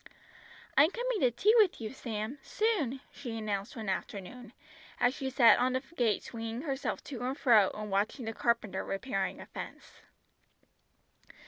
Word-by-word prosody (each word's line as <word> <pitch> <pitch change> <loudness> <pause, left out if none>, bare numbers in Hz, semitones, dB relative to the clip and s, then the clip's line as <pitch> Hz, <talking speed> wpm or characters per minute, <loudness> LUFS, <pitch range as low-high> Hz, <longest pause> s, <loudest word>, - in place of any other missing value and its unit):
"I'm 295 +3 +7
coming 485 +1 -2
to 255 - +4
tea 315 - +3
with 410 -5 +4
you, 225 +1 -5
Sam, 230 +1 -4
soon," 305 - 0
she 240 -5 -6
announced 205 -2 -3
one 220 -3 -6
afternoon, 205 +5 -5 0.5
as 245 +1 +3
she 265 -1 -3
sat 245 -3 +6
on 255 +1 +2
a 260 - 0
gate 240 - 0
swinging 230 +2 -5
herself 275 -3 -3
to 255 -5 -7
and 260 +3 -2
fro 220 -7 +5
and 210 -1 -5
watching 210 +6 0
the 225 - -3
carpenter 220 -5 0
repairing 195 -1 -2
a - - -8
fence. - - -9
240 Hz, 155 wpm, -31 LUFS, 215-270 Hz, 0.5 s, I'm